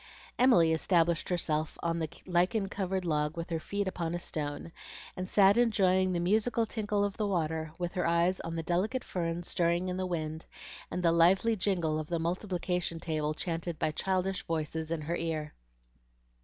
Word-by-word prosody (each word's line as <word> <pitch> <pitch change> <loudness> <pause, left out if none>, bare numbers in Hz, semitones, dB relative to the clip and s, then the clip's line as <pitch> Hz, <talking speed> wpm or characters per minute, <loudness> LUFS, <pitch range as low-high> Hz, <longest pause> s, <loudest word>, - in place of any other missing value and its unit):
Emily 175 -11 +5
established 170 0 +2
herself 160 -3 0
on 170 0 0
the 160 -2 -2 0.2
lichen 185 +3 +1
covered 190 -1 -2
log 150 -1 0
with 170 +1 -5
her 165 - 0
feet 200 +4 -2
upon 175 -2 -2
a - - -2
stone, 150 0 -4 0.4
and 185 0 -5
sat 200 +2 +5
enjoying 190 -5 +3
the 175 - 0
musical 220 +6 +2
tinkle 210 -2 0
of 200 - -4
the 215 -2 0
water, 160 -4 -1
with 175 -1 -3
her 180 -2 0
eyes 170 +2 +2
on 165 0 -5
the 165 - -2
delicate 190 +10 0
ferns 170 -1 -3
stirring 175 +1 +1
in 180 - -2
the 185 0 -1
wind, 160 -2 -4 0.4
and 180 +1 -3
the 170 - +5
lively 185 +7 +4
jingle 175 -6 0
of 155 - -5
the 170 - -1
multiplication 180 0 -2
table 155 -2 -2
chanted 165 -1 -3
by 155 - 0
childish 190 +3 -1
voices 160 0 -2
in 165 -1 -2
her 165 +3 -2
ear. 155 -2 -3
175 Hz, 180 wpm, -30 LUFS, 165-190 Hz, 0.4 s, Emily